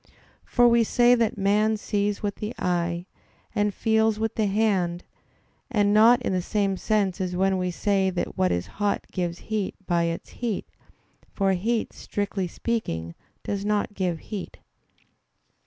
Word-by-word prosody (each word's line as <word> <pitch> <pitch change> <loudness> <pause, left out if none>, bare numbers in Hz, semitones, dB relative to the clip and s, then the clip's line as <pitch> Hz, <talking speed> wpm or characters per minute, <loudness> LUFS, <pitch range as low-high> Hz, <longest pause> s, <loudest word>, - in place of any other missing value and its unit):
For 245 -1 +4
we 235 0 +5
say 240 +2 +4
that 230 -4 +1
man 210 +2 +2
sees 205 0 -1
with 205 -1 -2
the 215 +3 -5
eye, 175 -1 -1 0.5
and 205 0 +1
feels 220 +1 +2
with 220 0 -1
the 215 -2 +1
hand, 195 -4 +1 0.7
and 205 -5 +2
not 235 +4 +6
in 190 - 0
the 185 - +1
same 200 +1 0
sense 200 -2 0
as 180 -1 -2
when 190 +1 +2
we 180 0 0
say 195 +1 +1
that 180 -1 -3
what 90 -1 +2
is 90 0 -1 0.2
hot 205 -1 +1
gives 175 -2 -2 0.2
heat 205 -3 -1
by 170 -1 +1
its 165 0 -4
heat; 235 -5 -3 0.7
for 195 -1 +1
heat, 220 +5 -1
strictly 200 -2 -3
speaking, 85 - -3 0.3
does 200 -1 -3
not 210 0 0
give 185 -4 -1
heat. 205 -4 -7
200 Hz, 155 wpm, -25 LUFS, 180-215 Hz, 0.7 s, not